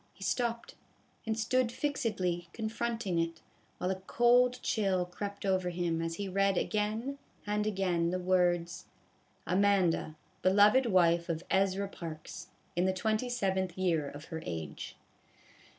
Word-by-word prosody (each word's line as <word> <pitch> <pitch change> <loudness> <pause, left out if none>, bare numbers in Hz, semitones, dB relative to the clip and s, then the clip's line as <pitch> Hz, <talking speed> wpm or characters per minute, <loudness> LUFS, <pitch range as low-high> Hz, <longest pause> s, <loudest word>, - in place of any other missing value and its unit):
He 195 - -10
stopped, 235 +2 -1 0.5
and 220 0 0
stood 235 +2 +1
fixedly 185 - -1
confronting 225 -4 -2
it, 165 -1 -2 0.3
while 180 - -1
a 190 - -3
cold 245 +1 +4
chill 195 -5 +1
crept 200 +3 -6
over 185 -2 +1
him 170 -2 -1
as 165 0 -2
he 200 +2 -4
read 195 0 +2
again 220 +8 -1 0.3
and 210 0 0
again 180 -4 +1
the 180 - -1
words: 180 -2 +1 0.3
" - - -37
Amanda, 190 -5 +2 0.3
beloved 205 +7 +5
wife 170 -4 +3
of 165 0 -2
Ezra 195 +1 +2
Parks, 160 -5 -8 0.3
in 175 +1 +2
the 190 - +2
ayth 195 -3 -1
year 165 -6 +1
of 145 +2 -10
her 160 - -3
age." 80 -3 -6
190 Hz, 135 wpm, -31 LUFS, 175-215 Hz, 0.5 s, beloved